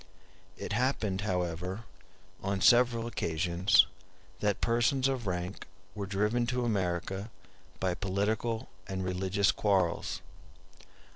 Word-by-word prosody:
It - - -4
happened, 110 -5 0
however, 90 +1 -2 0.6
on 100 0 -1
several 120 +1 +5
occasions, 85 -3 +3 0.5
that 105 -1 +1
persons 120 +3 +2
of 130 -5 -2
rank 90 +2 -3 0.3
were 100 -2 -4
driven 105 +5 +1
to 125 -1 0
America 95 -1 -1 0.5
by 95 -2 +1
political 105 +4 -1 0.2
and 95 -1 -3
religious 95 +3 +2
quarrels. 95 -5 0
100 Hz, 100 wpm, -31 LUFS, 95-115 Hz, 0.6 s, several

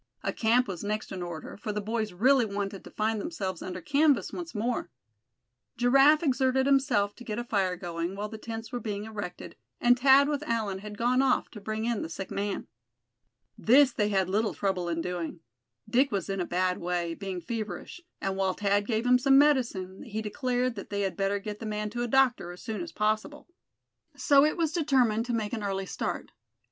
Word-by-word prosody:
A - - -1
camp 240 +2 +3
was 180 -2 -5
next 215 +1 -3
in 185 - -5
order, 175 -2 -6
for 210 +1 -4
the 210 - -2
boys 215 0 -2
really 250 +8 +4
wanted 200 -2 -4
to - - -11
find 215 0 -1
themselves 190 - -4
under 185 0 -5
canvas 285 - +2
once 345 -7 -6
more. 230 +3 -1 0.9
Giraffe 275 +6 +5
exerted 265 -2 +2
himself 260 -7 +2
to 245 - -10
get 215 -2 -4
a 240 - -2
fire 195 -6 0
going, 170 0 -4
while 205 +1 -3
the 220 0 -9
tents 225 0 -6
were 245 - -3
being 205 -3 -4
erected, 205 -5 -7 0.2
and 245 +1 +4
Thad 275 +2 +6
with 290 -1 -1
Allan 220 -8 -2
had 210 +1 -8
gone 245 +3 +2
off 265 -2 +2
to 210 - -10
bring 215 +2 -3
in 235 -2 0
the - - -4
sick 190 +3 -6
man. 200 0 -2 0.9
This 265 +4 +5
they 210 -1 +1
had 190 -3 +1
little 210 +3 0
trouble 185 -3 -1
in 165 -1 -1
doing. 175 -2 -4 0.5
Dick 265 +2 +3
was 195 -1 -2
in 195 -1 -2
a - - -1
bad 180 +1 0
way, 175 -1 -2
being 190 0 -5
feverish; 220 - -5 0.2
and 195 0 -2
while 190 -1 +1
Thad 205 +1 +1
gave 225 0 0
him 250 0 +5
some 270 +1 +5
medicine, 240 -10 +2
he 220 0 -5
declared 250 +2 -1
that 200 - -7
they 200 0 -2
had 195 -2 -1
better 195 0 0
get 210 +1 -6
the 225 - -5
man 210 0 -3
to 240 - -3
a 240 - 0
doctor 250 -7 +2
as 175 - -11
soon 215 -4 -4
as 170 -1 -6
possible. 215 - -1 0.7
So 280 -2 +5
it 305 - 0
was 325 -3 +1
determined 250 -8 +2
to 245 - -1
make 220 -1 -2
an 225 - -2
early 195 -1 -2
start. - - -4
215 Hz, 205 wpm, -28 LUFS, 195-250 Hz, 0.9 s, Thad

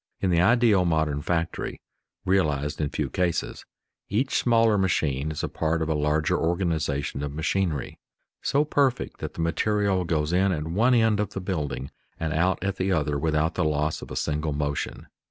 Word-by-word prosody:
In 95 - +1
the 85 -1 +3
ideal 115 -2 +4
modern 80 -4 0
factory 85 +1 -2 0.5
(realized 75 -7 +1
in 75 - 0
few - - -2
cases) 90 -2 -2 0.5
each 125 +7 0
smaller 115 -2 +4
machine 80 -7 0
is 80 - -4
a - - 0
part 80 +1 -1
of 80 - -3
a - - +2
larger 75 +1 +1
organization 80 -5 -1
of 75 -1 -3
machinery, 80 -2 -1 0.4
so 145 +2 +2
perfect 140 -4 0
that - - -6
the - - -3
material 100 +2 +1
goes 80 -1 -1
in 95 +2 +3
at 75 -3 -2
one 115 +10 +3
end 110 -3 +3
of 105 -2 -2
the - - -3
building 80 -7 -3 0.3
and 80 -1 -2
out 90 +3 +1
at 100 -1 -1
the 95 +1 0
other 75 -4 0
without 80 +1 +1
the - - 0
loss 75 0 0
of - - -9
a - - -6
single 75 0 -1
motion. 75 0 -3
85 Hz, 180 wpm, -26 LUFS, 75-95 Hz, 0.5 s, ideal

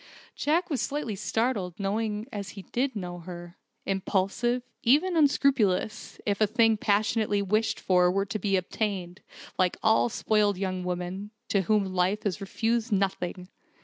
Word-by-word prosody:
Jack 330 +4 +1
was 275 - 0
slightly 275 -7 -2
startled, 210 -3 -1
knowing 210 +1 -1
Juliet - - -13
as 200 -2 -4
he 195 -2 -9
did 260 +5 -1
know 175 -3 -5
her: 175 0 -9 0.3
impulsive, 195 +5 0 0.2
even 310 +9 +3
unscrupulous, 265 - +2
if 205 0 0
a 215 - +5
thing 225 +1 +4
passionately 210 0 +1
wished 215 +3 +1
for 180 -1 +3
were 195 +1 0
to 215 +2 -4
be 200 -2 +1
obtained 185 -1 -2 0.4
like 185 -1 +2
all 220 +2 +4
spoiled 210 -3 +1
young 185 -1 -2
women, 180 +3 -4 0.2
to 200 - +3
whom 210 +2 +2
life 185 +3 +1
has 200 0 -2
refused 225 +4 -1
nothing. 190 -2 -1
205 Hz, 150 wpm, -27 LUFS, 185-225 Hz, 0.4 s, a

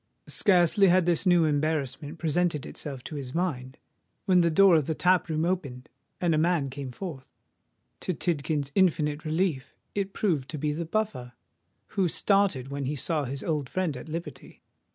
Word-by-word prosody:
Scarcely 190 +1 +3
had 180 -1 +4
this 175 +2 +2
new 175 -2 +5
embarrassment 150 0 -1
presented 165 -2 0
itself 135 -4 -6
to - - -8
his 135 -1 -7
mind, 135 -8 -2 0.5
when 185 -2 +4
the 170 - +3
door 185 +2 +6
of 155 -4 +2
the 160 - -1
tap 180 0 +2
room 160 +1 0
opened, 145 -9 -3 0.3
and 175 -2 +1
a 155 - +2
man 160 -5 +1
came 135 0 -6
forth. 135 -1 -7 0.7
To 185 - -2
Tidkins's 150 -3 -1
infinite 155 -5 +1
relief 155 -4 -1 0.2
it 200 -1 -2
proved 155 -11 -1
to 155 - -5
be 150 +1 -1
the 165 +2 -4
Buffer, 160 - -3 0.6
who 195 -3 +1
started 185 -8 +1
when 140 0 -4
he 145 +3 -2
saw 150 +2 0
his 135 +2 -4
old 150 -5 -2
friend 185 -6 -1
at 125 +5 -9
liberty. 155 -4 -8
155 Hz, 175 wpm, -27 LUFS, 140-180 Hz, 0.7 s, door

